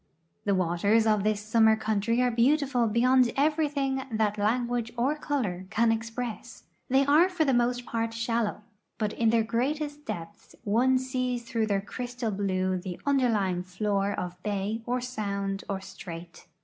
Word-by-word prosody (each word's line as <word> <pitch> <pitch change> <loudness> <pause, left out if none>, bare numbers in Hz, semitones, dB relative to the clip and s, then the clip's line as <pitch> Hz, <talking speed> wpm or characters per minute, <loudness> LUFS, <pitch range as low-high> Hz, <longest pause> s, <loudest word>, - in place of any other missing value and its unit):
The 200 -1 +2
waters 185 +5 +2
of 215 -2 +2
this 215 -1 +1
summer 220 +1 +4
country 220 +2 0
are 250 - +2
beautiful 255 0 +2
beyond 250 +2 +4
everything 285 -2 +1
that 215 -1 0
language 235 +2 0
or 255 +5 +2
color 225 - -2
can 225 +1 +3
express. 230 +1 -4 0.3
They 270 +2 +4
are 310 +6 +5
for 355 -4 0
the 270 - +2
most 245 0 +1
part 230 -1 -2
shallow, 230 -2 -1 0.3
but 215 -1 -1
in 230 -1 +2
their 225 0 +3
greatest 290 +6 -2
depths 175 +5 -7
one 245 +5 +3
sees 255 -1 -2
through 230 -2 -1
their 200 -2 +1
cr}\stal 245 +2 -4
blue 185 -2 0
the 180 -1 -6
underlying 225 -10 +2
floor 195 +2 -1
of 180 0 -5
bay 205 +2 -2
or 250 +1 0
sound 200 -5 -3
or 195 -1 -2
strait. 170 -3 -10
230 Hz, 155 wpm, -28 LUFS, 205-250 Hz, 0.3 s, are